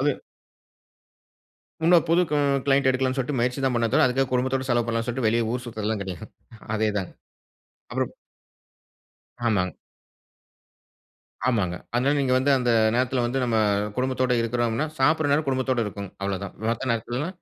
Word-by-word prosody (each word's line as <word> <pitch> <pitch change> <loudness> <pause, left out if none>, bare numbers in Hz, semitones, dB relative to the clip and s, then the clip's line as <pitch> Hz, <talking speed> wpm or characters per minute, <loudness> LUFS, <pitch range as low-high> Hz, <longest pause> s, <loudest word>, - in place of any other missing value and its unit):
அது. 145 0 +1 1.6
இன்னும் 170 0 +5
புது 170 +2 +4
கு 150 - +1 0.3
க்ளையன்ட் 140 -1 +3
எடுக்கலாம்னு 130 0 +1
சொல்ட்டு 130 +2 -1
முயற்சி 125 +3 0
தான் 130 - +2
பண்ணனே 115 -1 +1
தவிர, - - +5
அதுக்காக 130 +1 +1
குடும்பத்தோட 130 +1 0
செலவு 120 -1 +2
பண்ணலாம்னு 115 0 -1
சொல்லிட்டு 120 -1 -1
வெளிய 115 0 +1
ஊர் 125 0 -3
சுத்துறது 110 -3 -6
எல்லாம் 110 -1 -1
கெடையாது. 95 -4 -7 0.5
அதே 110 0 +1
தாங்க. 95 -3 -4 0.8
அப்பறம் - - -2 1.3
ஆமாங்க. 95 -5 +1 1.7
ஆமாங்க. 95 -8 0 0.2
அதனால 130 +4 +2
நீங்க 130 -2 +1
வந்து 135 +2 +1
அந்த 125 -1 +1 0.2
நேரத்துல 125 0 +1
வந்து 125 +3 -1
நம்ம, 115 -2 0 0.4
குடும்பத்தோட 130 0 0
இருக்குறோம்னா, 120 +3 0
சாப்புட்ற 150 +2 +3
நேரம் 150 +1 +1
குடும்பத்தோடு 130 -2 0
இருக்கும். 100 -1 -6
அவ்ளோதான். 100 0 -3 0.2
மத்த 120 +2 -2
நேரத்துல, 120 +6 -3
125 Hz, 145 wpm, -25 LUFS, 115-135 Hz, 1.7 s, இன்னும்